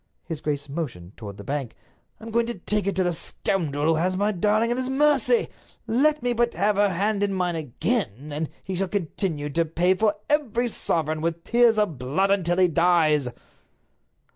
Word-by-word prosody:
His 160 -2 -6
grace 145 -1 -2
motioned 125 - -6
toward 100 -3 -9
the 100 - -9
bank. 135 -3 -4 0.4
"I'm 225 +1 -9
going 230 +1 +1
to 235 - -3
take 210 +2 -1
it 200 - 0
to 190 - +2
the 175 -1 0
scoundrel 160 -3 -1
who 160 0 +3
has 185 +3 0
my 205 +2 +1
darling 215 +4 +1
at 240 - 0
his 255 0 -2
mercy. 295 - +3 0.4
Let 295 +4 +2
me 245 0 +2
but 235 0 0
have 200 +4 +1
her 205 0 +4
hand 200 +3 0
in 200 -1 +1
mine 180 -2 0
again, 150 - -2
and 150 +1 -3
he 190 - -4
shall 195 +2 0
continue 165 -5 -2
to 165 +4 +2
pay 170 +3 +2
for 210 +2 +1
every 250 -5 +1
sovereign 155 -6 -1
with 165 0 -2
tears 235 -2 +4
of 200 -11 0
blood 155 +11 0
until 175 -3 +1
he 185 -1 +5
dies." 165 -5 +3
185 Hz, 190 wpm, -24 LUFS, 155-215 Hz, 0.4 s, he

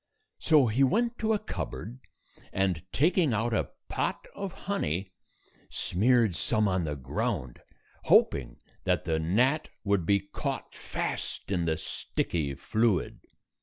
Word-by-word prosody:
So 155 -5 +5
he 120 +4 +2
went 235 - +2
to 220 0 +1
a 215 - +4
cupboard, 125 - -6 0.5
and, 95 -3 0
taking 160 - +3
out 115 +2 0
a - - 0 0.2
pot - - -2
of 200 -2 -4
honey, 95 - -1 0.6
smeared 110 0 +2
some 110 +2 +1
on 95 -3 +1
the 75 -1 -2
ground, 75 - -3 0.4
hoping - - +4 0.3
that - - +1
the 80 -1 +1
gnat 125 - +2
would 100 -5 +1
be 100 0 +4
caught 100 +1 -5
fast - - -4
in 90 -3 +1
the 80 -1 +1
sticky 75 -5 -2
fluid. 110 +5 0
105 Hz, 130 wpm, -29 LUFS, 85-130 Hz, 0.6 s, So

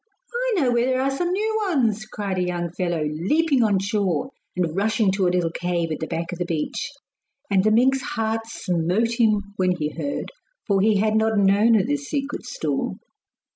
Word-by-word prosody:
'I - - 0
know 255 -3 +2
where 240 +1 +2
there 255 0 +1
are 270 +1 0
some 350 +4 -1
new 435 +3 0
ones,' 225 - +1
cried 200 -3 -3
a - - +1
young 175 -1 -2
fellow, 175 -3 -1
leaping 250 - +1
on 205 -3 +3
shore 200 - -1 0.2
and 170 -3 -1
rushing 215 0 +2
to 190 -1 +1
a - - +4
little 175 -2 0
cave 170 -1 -2
at 155 - -3
the 160 - -3
back 165 +3 -3
of 175 - -6
the - - +1
beach. 165 -3 -2 0.6
And 190 -1 +4
the 215 - +4
mink's 260 +5 +3
heart 225 -2 -2
smote 200 +4 -1
him 215 -3 +3
when 185 -1 +2
he 150 -3 -2
heard, 285 - -4 0.3
for 200 -3 +2
he 215 0 +4
had 215 +2 +2
not 220 0 +2
known 205 +3 +5
of - - +1
this 285 +1 -2
secret 280 -1 -3
store. - - -2
210 Hz, 200 wpm, -23 LUFS, 180-245 Hz, 0.6 s, known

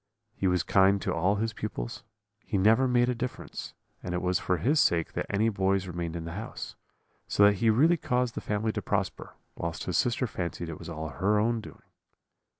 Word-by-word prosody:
He 95 - -1
was 90 -3 +2
kind 95 +3 +4
to - - 0
all 95 +5 +2
his 110 +2 -1
pupils; 85 - -5 0.4
he - - -1
never 110 +7 +4
made 120 -1 +3
a 125 - +1
difference: 125 +1 -6 0.3
and 90 0 -4
it 90 - -1
was 90 0 +1
for 90 - 0
his 145 - +2
sake 85 - +2
that - - -3
any 105 +3 +2
boys 95 -2 +1
remained 85 -2 -4
in 85 -1 -4
the 85 - -5
house; 105 +5 -6 0.5
so 100 - +3
that 100 0 +6
he 115 +3 +3
really 155 +10 +4
caused 125 -4 0
the - - -5
family 105 +1 -1
to - - -3
prosper, - - -2 0.2
whilst 85 0 -4
his 90 - -1
sister 125 +1 +1
fancied 85 -5 -4
it 80 - -7
was 85 - -8
all 80 -1 -5
her 95 +10 +1
own 115 +2 +1
doing. - - -13
100 Hz, 210 wpm, -28 LUFS, 85-115 Hz, 0.5 s, that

